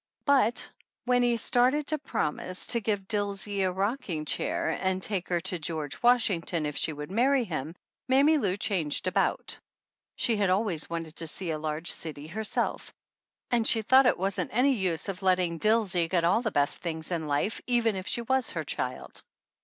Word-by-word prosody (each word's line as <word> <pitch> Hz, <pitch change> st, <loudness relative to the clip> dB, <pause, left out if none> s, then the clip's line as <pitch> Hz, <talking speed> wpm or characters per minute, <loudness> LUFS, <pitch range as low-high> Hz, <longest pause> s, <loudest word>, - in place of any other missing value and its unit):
But 265 Hz, -5 st, +3 dB, 0.4 s
when 250 Hz, 0 st, +3 dB
he 240 Hz, -1 st, +2 dB
started 255 Hz, +6 st, +3 dB
to 310 Hz, +1 st, 0 dB
promising 185 Hz, -, -2 dB
to 235 Hz, -, +3 dB
give 200 Hz, -3 st, -1 dB
Dilsey 205 Hz, -1 st, -1 dB
a 185 Hz, -1 st, +1 dB
rocking 190 Hz, -, -2 dB
chair -, -, -1 dB
and 190 Hz, 0 st, 0 dB
take 190 Hz, -2 st, -2 dB
her 175 Hz, -1 st, +1 dB
to 185 Hz, 0 st, -1 dB
"George 155 Hz, -3 st, -4 dB
Washington" 195 Hz, -9 st, +2 dB
if 150 Hz, -1 st, -3 dB
she 160 Hz, -, -1 dB
would 150 Hz, +3 st, -7 dB
marry 255 Hz, +5 st, +3 dB
him, 160 Hz, -, -5 dB, 0.3 s
Mammy 280 Hz, +4 st, +4 dB
Lou 195 Hz, -6 st, 0 dB
changed 180 Hz, -8 st, -1 dB
about. -, -, 0 dB, 0.6 s
She 230 Hz, -3 st, +1 dB
had 200 Hz, -2 st, +1 dB
always 185 Hz, -4 st, 0 dB
wanted 165 Hz, -1 st, -5 dB
to 165 Hz, -, -3 dB
see 170 Hz, +2 st, -4 dB
a 155 Hz, -, -3 dB
large 155 Hz, +2 st, -3 dB
city 150 Hz, -3 st, -6 dB
herself, 210 Hz, +7 st, -2 dB, 0.6 s
and 235 Hz, -2 st, +2 dB
she 225 Hz, -1 st, +2 dB
thought 260 Hz, +3 st, +6 dB
it -, -, +3 dB
wasn't 195 Hz, +2 st, -1 dB
any 260 Hz, +5 st, +3 dB
use 185 Hz, -8 st, -1 dB
of 195 Hz, -1 st, -5 dB
letting 180 Hz, -3 st, +1 dB
Dilsey 205 Hz, -5 st, +2 dB
get 175 Hz, -2 st, +1 dB
all 185 Hz, +7 st, +3 dB
the 230 Hz, -, -1 dB
best 145 Hz, -7 st, +1 dB
things 160 Hz, -1 st, -4 dB
in 165 Hz, -3 st, -2 dB
life, 145 Hz, +9 st, -1 dB
even 235 Hz, -3 st, +2 dB
if 185 Hz, -1 st, -6 dB
she 235 Hz, -, 0 dB
was 260 Hz, 0 st, +1 dB
her 160 Hz, -, -3 dB
child. 130 Hz, -3 st, -5 dB
190 Hz, 185 wpm, -28 LUFS, 165-230 Hz, 0.6 s, thought